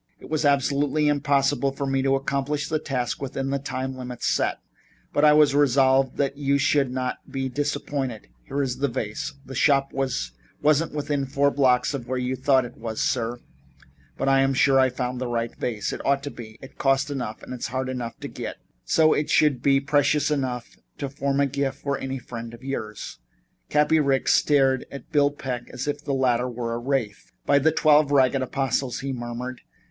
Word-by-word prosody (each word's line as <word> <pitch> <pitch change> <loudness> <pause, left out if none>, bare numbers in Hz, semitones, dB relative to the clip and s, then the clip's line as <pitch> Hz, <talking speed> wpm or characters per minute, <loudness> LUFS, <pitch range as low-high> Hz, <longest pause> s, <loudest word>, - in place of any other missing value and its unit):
It - - -13
was 155 -1 0
absolutely 145 +2 +2
impossible 140 -1 +2
for 140 - -3
me 135 0 0
to 135 0 +2
accomplish 140 +2 -1
the 155 -1 0
task 130 -5 -3
within 135 0 -3
the 140 - 0
time 130 -1 -4
limit 125 -1 -7
set, - - +1 0.6
but 145 - +2
I 150 0 +7
was 150 -2 +5
resolved 135 -2 +3
that 140 -1 0
you 140 -1 +1
should 140 -1 +2
not 125 0 -3
be 135 -1 -2
disappointed. 140 - -3 0.2
Here 140 0 -1
is 125 -2 -2
the 140 - +2
vase. 120 +2 -4
The 135 - -9
shop 135 +1 +2
wasn't 135 - -1
within 145 -2 -1
four 140 +1 +2
blocks 130 -1 +2
of 130 -3 -5
where 130 +1 -2
you 125 +1 -1
thought 130 -1 +3
it 120 - -11
was, 110 -1 -5
sir, 120 0 -1 0.8
but - - -1
I'm 135 0 +3
sure 135 +1 +4
I 130 0 +4
found 125 0 -3
the 130 - -1
right 115 -1 -2
vase. 110 -5 -3
It - - -6
ought 140 0 +1
to 145 - -5
be. 110 -2 -10
It 135 - -13
cost 135 +1 +2
enough 125 -6 -5
and - - -9
was 125 -2 -4
hard 130 +1 -3
enough 125 -3 -5
to - - -4
get, - - -6 0.3
so 155 - +4
it 150 - -1
should 145 -5 +3
be 135 0 +4
precious 145 +1 +2
enough 130 -4 -3 0.2
to 140 - -4
form 140 0 -1
a 140 - +4
gift 140 0 -2
for 140 -1 -1
any 135 0 -4
friend 115 -2 -8
of 120 - -17
yours." 110 -6 -5 0.5
Cappy 150 +2 +3
Ricks 135 -3 +2
stared 135 -3 +3
at 140 +3 -10
Bill 145 -2 +4
Peck 130 -4 -5
as 130 +2 -5
if 145 0 -3
the 140 -2 -1
latter 125 -1 +1
were 120 -1 -4
a 115 - -2
wraith. 120 - -2
"By 140 - +4
the 160 +3 +3
Twelve 150 -2 +4
Ragged 135 -1 +3
Apostles!" 130 -1 -1
he 135 0 -3
murmured. 120 +1 -5
135 Hz, 195 wpm, -24 LUFS, 125-140 Hz, 0.8 s, I